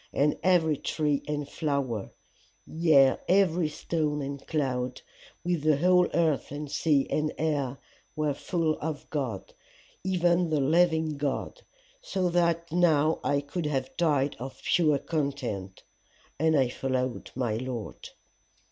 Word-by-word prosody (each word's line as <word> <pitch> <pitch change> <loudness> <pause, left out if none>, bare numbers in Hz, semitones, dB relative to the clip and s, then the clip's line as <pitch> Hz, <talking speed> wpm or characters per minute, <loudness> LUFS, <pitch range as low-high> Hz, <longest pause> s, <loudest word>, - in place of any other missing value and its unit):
And 145 +1 +2
every 165 -5 +3
tree 150 -1 -1
and 150 -1 -2
flower, 140 -9 -2 0.6
yea 155 -5 +4
every 180 -4 +3
stone 150 -1 -2
and 140 0 -6
cloud, 130 -5 -2 0.4
with 175 -3 0
the 155 -1 +3
whole 180 +3 +4
earth 160 -5 +1
and 145 0 -6
sea 145 -4 +2
and 155 0 0
air, 145 -4 -1 0.4
were 150 -1 0
full 160 +1 -1
of 155 -1 -4
God, 130 -10 -3 0.5
even 175 -2 +2
the 155 -2 +1
living 160 +1 +2
God 145 - -3 0.4
so 190 - -1
that 170 -1 +1
now 160 -3 +3
I 140 0 +1
could 150 +3 -4
have 135 -3 -2
died 145 -5 +1
of 130 +2 -7
pure 155 -4 +3
content. 135 - -3 0.6
And 160 0 +3
I 130 -3 +3
followed 130 -1 -2
my 120 -4 -1
Lord. 125 -2 -6
150 Hz, 130 wpm, -28 LUFS, 135-165 Hz, 0.6 s, yea